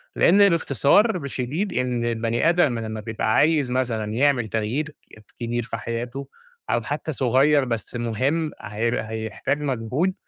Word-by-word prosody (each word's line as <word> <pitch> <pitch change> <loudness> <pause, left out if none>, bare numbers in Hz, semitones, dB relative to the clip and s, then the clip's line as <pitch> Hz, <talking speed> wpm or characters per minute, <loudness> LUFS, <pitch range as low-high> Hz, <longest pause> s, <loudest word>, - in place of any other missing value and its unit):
لإن 200 +3 +6
باختصار 170 - +2
شديد 140 +10 -3
إن 125 -2 -1
البني 115 +5 +1
آدم 155 -9 +2
لمّا 110 -1 -5
بيبقى 110 0 -1
عايز 150 -4 +3
مثلًا 115 -4 -1
يعمل 130 -1 +2
تغيير 125 +9 -2 0.4
كبير 120 0 -2
في 115 0 -5
حياتُه 120 +4 -5 0.4
أو 120 - +1
حتى 145 +6 -4
صغير 135 +2 +3
بس 115 -1 -4
مهم، 130 +7 -1
هي 110 +3 -1
هيحتاج 110 +6 -3
مجهود، 135 +7 -1
125 Hz, 135 wpm, -23 LUFS, 115-145 Hz, 0.4 s, لإن